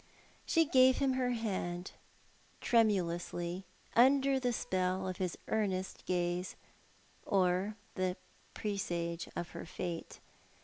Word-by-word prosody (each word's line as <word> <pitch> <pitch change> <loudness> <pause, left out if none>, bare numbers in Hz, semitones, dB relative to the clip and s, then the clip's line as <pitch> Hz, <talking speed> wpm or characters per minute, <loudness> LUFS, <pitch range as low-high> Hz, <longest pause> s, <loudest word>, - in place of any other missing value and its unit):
She 330 -1 +4
gave 260 -2 +6
him 270 -2 +2
her 255 -1 +1
hand, 185 -6 -3 0.7
tremulously, 180 -4 +1 0.3
under 270 +2 +5
the 250 -1 +1
spell 185 -3 -1
of 185 -1 -3
his 185 -2 -2
earnest 190 -4 -1
gaze, 180 0 -1 0.7
or 190 +2 +1 0.2
the 185 -1 -1 0.4
presage 170 -5 -2
of 175 - -3
her - - -8
fate. 170 -1 -5
185 Hz, 105 wpm, -34 LUFS, 175-230 Hz, 0.7 s, gave